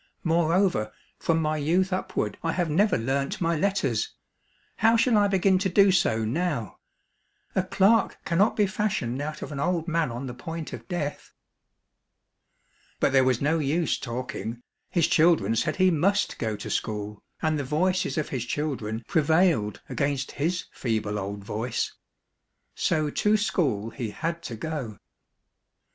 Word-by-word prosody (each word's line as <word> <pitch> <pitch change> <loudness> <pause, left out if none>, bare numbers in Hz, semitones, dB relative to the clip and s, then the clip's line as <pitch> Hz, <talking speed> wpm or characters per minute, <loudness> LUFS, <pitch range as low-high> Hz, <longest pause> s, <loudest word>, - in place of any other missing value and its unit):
Moreover, 165 - +2 0.3
from 165 -1 +1
my 155 -1 0
youth 180 +6 +1
up 185 - -3
ward 105 -1 -1
I 165 - -1
have 175 -4 0
never 195 +4 +3
learnt 135 +4 -1
my 170 -1 +1
letters; 155 - 0 0.6
how 225 +2 +4
shall 230 0 +3
I 205 -1 +5
begin 190 -1 +3
to 190 0 0
djo 195 +2 +5
so 110 -11 +2
now 140 - -2 0.4
} - - -41
A 190 - +4
clerk 195 +4 +3
cannot 190 +6 +2
be 210 - +3
fashioned 190 - -1
out 155 +1 -5
of - - -7
an 140 - -5
old 170 +2 0
man 165 -3 +1
on 120 +3 -5
the 125 - -5
point 160 +5 -6
of - - -8
death! 155 -6 -4 0.8
" - - -40
But - - +3
there 135 -1 +5
was 130 -2 +1
no 160 +3 +2
use 155 +3 0
talking, 120 -1 -5 0.3
his 170 -3 +2
children 155 - +3
said 115 - 0
he 185 0 +4
must 195 +6 +1
go 110 -3 -1
to 105 - -6
school, 105 -1 -3 0.2
and 155 -1 0
the - - -1
voices 180 +7 0
of 155 - -1
his 130 -4 -2
children 120 -5 -3
prevailed 160 - +2
against 140 -2 -1
his 170 +5 -1
feeble 110 -3 -2
old 100 +1 -5
voice. 110 +4 -2 0.8
So 155 -2 0
to 210 +6 +2
school 130 - 0
he 115 -3 -4
had 170 +9 -3
to 115 - -5
go. 125 - -5
155 Hz, 160 wpm, -26 LUFS, 120-180 Hz, 0.8 s, I